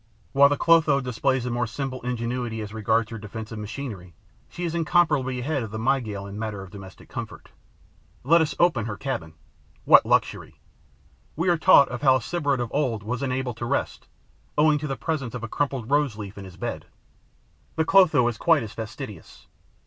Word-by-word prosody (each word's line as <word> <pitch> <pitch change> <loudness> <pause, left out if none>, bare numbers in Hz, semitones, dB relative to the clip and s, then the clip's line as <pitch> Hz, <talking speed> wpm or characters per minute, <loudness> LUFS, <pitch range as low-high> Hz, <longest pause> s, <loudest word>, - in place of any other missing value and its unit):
While 140 +1 +6
the 145 - 0
Clotho 160 -4 +4
displays 125 0 -1
a 125 - -2
more 120 -1 -1
simple 130 +2 -5
ingenuity 120 -1 -3
as 105 0 -7
regards 110 +1 0
her 115 - -6
defensive 110 +1 -7
machinery, 105 - -7 0.3
she 175 - -7
is 170 -2 -2
incomparably 155 -6 +2
ahead 145 +1 -1
of 115 - -5
the 110 - -6
Mygale 110 -4 -1
in 100 - -9
the 105 - -6
matter 105 -3 -4
of 95 - -12
domestic 95 -2 -12
comfort. - - -8 0.7
Let 165 +6 +5
us 155 - -1
open 165 -11 +2
her 105 - -5
cabin. 80 - -4 0.5
What - - +8
luxury! - - 0 0.8
We 170 +4 0
are 175 - +3
taught 140 -7 +5
how 135 -3 +5
a - - +2
Sybarite 145 -6 -1
of 120 -2 -3
old 125 -8 0
was 125 +4 -3
unable 130 -2 -2
to 115 +1 -6
rest, - - -2 0.5
owing 150 0 +4
to 150 - -4
the 135 - -3
presence 140 -7 -3
of 120 - -6
a - - -3
crumpled 135 -1 -2
rose 145 -6 +2
leaf 105 -2 -7
in 100 - -9
his 90 -2 -12
bed. - - -5 0.9
The 160 - +1
Clotho 160 -10 +5
is 120 -2 -3
quite 165 -6 +3
as 110 - -8
fastidious. 110 -1 -8
125 Hz, 190 wpm, -25 LUFS, 110-145 Hz, 0.9 s, What